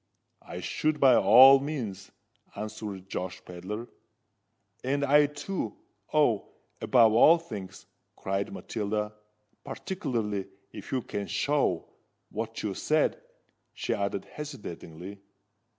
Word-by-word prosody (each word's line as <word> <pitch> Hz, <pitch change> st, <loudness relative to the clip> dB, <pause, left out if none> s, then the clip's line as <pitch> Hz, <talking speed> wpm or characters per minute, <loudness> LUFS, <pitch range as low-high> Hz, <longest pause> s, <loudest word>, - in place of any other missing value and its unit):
"I -, -, -8 dB
should, 155 Hz, -1 st, -1 dB
by 130 Hz, -2 st, +7 dB
all 130 Hz, +7 st, +8 dB
means," 135 Hz, -9 st, -5 dB, 0.5 s
answered 105 Hz, -3 st, -6 dB
Josh 90 Hz, -1 st, -4 dB
Pedler. 95 Hz, +6 st, -6 dB, 1.0 s
"And 140 Hz, +2 st, 0 dB
I 145 Hz, +1 st, +5 dB
too——Oh! 145 Hz, -, -2 dB, 0.3 s
above 115 Hz, -4 st, +5 dB
all 155 Hz, +9 st, +7 dB
things!" 100 Hz, -, -9 dB, 0.3 s
cried 95 Hz, +1 st, -2 dB
Matilda: 105 Hz, -1 st, -3 dB, 0.5 s
"particularly, 115 Hz, -, -3 dB, 0.2 s
if -, -, -10 dB
you 130 Hz, -3 st, -1 dB
can 100 Hz, -1 st, -4 dB
show——what 145 Hz, 0 st, -3 dB
you -, -, -1 dB
said," -, -, +1 dB, 0.5 s
she -, -, -2 dB
added 100 Hz, -1 st, -2 dB
hesitatingly. 100 Hz, -, -8 dB
110 Hz, 100 wpm, -28 LUFS, 100-140 Hz, 1.0 s, all